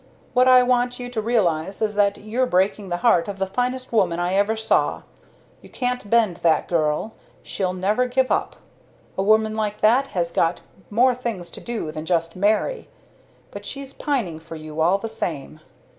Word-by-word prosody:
What 255 0 +4
I 255 -1 +7
want 245 0 +1
you 245 0 -6
to 225 -3 -2
realize 195 -6 0
is 215 -1 0
that 205 -1 +2
you're 235 +5 -1
breaking 195 0 +1
the 175 - -1
heart 175 -8 +4
of 200 -1 -5
the 195 - 0
finest 250 +5 -3
woman 175 -6 +2
I 175 +1 0
ever 205 +3 +2
saw. 220 - +1 0.6
You - - -15
can't 250 -4 -3
bend 220 -6 +3
that 165 -2 +2
girl 160 +5 0 0.3
she'll 185 -2 -2
never 210 +7 +1
give 255 +1 +1
up. - - 0 0.6
A - - -1
woman 215 +2 +3
like 210 -1 -2
that 245 +6 +4
has 170 -1 0
got 165 0 +1 0.3
more 250 +4 +4
things 225 -9 -5
to - - -9
do 230 -10 -4
than 155 +1 -7
just 165 -2 0
marry! 215 - 0 0.6
But - - -8
she's 275 -1 -7
pining 225 - -2
for 165 0 -10
you 155 0 -6
all 175 +4 +4
the 225 - -5
same. 155 -8 -5
210 Hz, 185 wpm, -22 LUFS, 175-245 Hz, 0.6 s, I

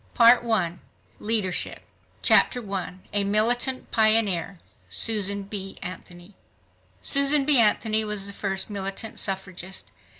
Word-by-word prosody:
Part 240 +1 +5
I 185 -7 -1 0.4
Leadership 205 -6 -2 0.4
Chapter 250 - +4
1 190 -4 -6
A 205 -1 +1
Militant 240 +6 +1
Pioneer—Susan 200 - +1
B. 195 -1 -7
Anthony 180 +1 -10 0.7
Susan 280 0 +3
B. 290 -3 +5
Anthony 220 0 +2
was 210 -2 0
the 200 - 0
first 195 -1 -3
militant 195 +2 -5
suffragist. 190 -1 -5
200 Hz, 105 wpm, -24 LUFS, 190-225 Hz, 0.7 s, Part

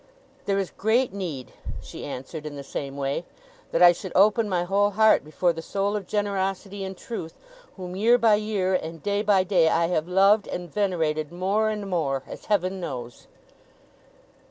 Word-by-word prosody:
'There 200 -1 +2
is 195 -2 -2
great 225 +2 +1
need,' 165 -10 -5 0.3
she - - -9
answered, 145 +4 -6
in 145 - -7
the 140 - -7
same 140 0 -5
way, 140 +4 -2 0.5
'that - - +3
I 175 - +10
should 180 +1 -6
open 210 +3 +4
my 180 -2 +1
whole 200 +3 +2
heart 220 +2 +4
before 170 +4 0
the 165 - -6
soul 200 +4 -1
of 200 -3 -4
generosity 200 -1 -2
and 190 -1 -6
truth, 195 -9 -6 0.4
whom, 180 -1 -6
year 230 +5 +4
by 230 -3 +4
year, 205 -3 0
and 165 -3 -3
day 205 0 0
by 200 -3 +3
day, 175 -4 +3
I 165 +1 +2
have 160 -2 0
loved 195 +3 +4
and 175 -2 -6
venerated 160 -6 0
more 195 +5 +1
and 210 -2 -4
more, 140 -8 -1
as - - -9
Heaven 190 -2 0
knows! 125 -8 -7
190 Hz, 180 wpm, -25 LUFS, 165-205 Hz, 0.5 s, I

